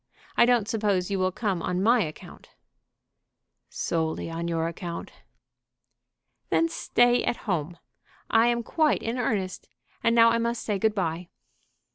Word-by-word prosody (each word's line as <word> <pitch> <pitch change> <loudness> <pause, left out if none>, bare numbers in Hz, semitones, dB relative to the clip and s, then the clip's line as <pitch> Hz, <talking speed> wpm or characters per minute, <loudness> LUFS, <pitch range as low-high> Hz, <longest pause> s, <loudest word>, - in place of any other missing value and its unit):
I 235 - +5
don't 240 -4 +3
suppose 205 -4 0
you 195 - 0
will 185 0 +1
come 190 -3 -2
on 180 +2 -1
my 235 +2 +4
account." 155 -5 -8 1.2
"Solely 160 0 -2
on 165 +1 -4
your 165 -1 -1
account." 170 0 -6 1.4
"Then 330 - +2
stay 245 -5 +2
at - - -3
home. 175 -4 -2 0.5
I 225 +1 +4
am 235 0 +1
quite 310 +4 +1
in 235 +3 -2
earnest. 195 -6 -2 0.3
And 230 0 +3
now 230 0 +7
I 230 - +1
must 235 0 -2
say 205 -3 -1
good 220 +1 +1
bye." 170 -2 -2
205 Hz, 145 wpm, -26 LUFS, 175-235 Hz, 1.4 s, now